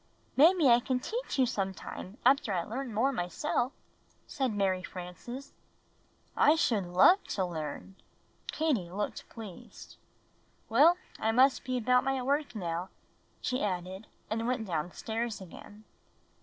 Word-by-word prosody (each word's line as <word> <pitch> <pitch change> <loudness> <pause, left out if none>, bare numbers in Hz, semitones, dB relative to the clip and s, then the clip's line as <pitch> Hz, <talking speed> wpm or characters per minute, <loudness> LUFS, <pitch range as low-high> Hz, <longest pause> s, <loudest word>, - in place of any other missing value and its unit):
"Maybe 325 +1 +6
I 240 -1 +7
can 250 +1 -1
teach 465 - -4
you 260 - +5
some 195 -5 -2
time 190 +4 -8
after 270 -6 +4
I 175 -3 0
learn 250 +5 -5
more 230 +6 +2
myself," 240 - -1 0.5
said 265 -4 -1
Mary 195 -3 0
Frances. 185 +10 -8 0.8
"I 300 - +5
should 220 - +1
love 190 - +5
to 190 - -1
learn." 165 +2 -6 0.5
Katie 275 - 0
looked 205 +3 -4
pleased. 215 -6 -11 0.7
"Well, 300 +10 +6 0.2
I 220 - +1
must 260 +4 +4
be 255 0 -2
about 250 +1 +3
my 270 0 0
work 280 -1 0
now," 175 -2 -3 0.5
she 255 0 -1
added, 190 +1 -3 0.2
and 225 +2 -2
went 245 -3 -1
downstairs 210 +7 -3
again. 205 +3 -12
225 Hz, 135 wpm, -30 LUFS, 185-265 Hz, 0.8 s, I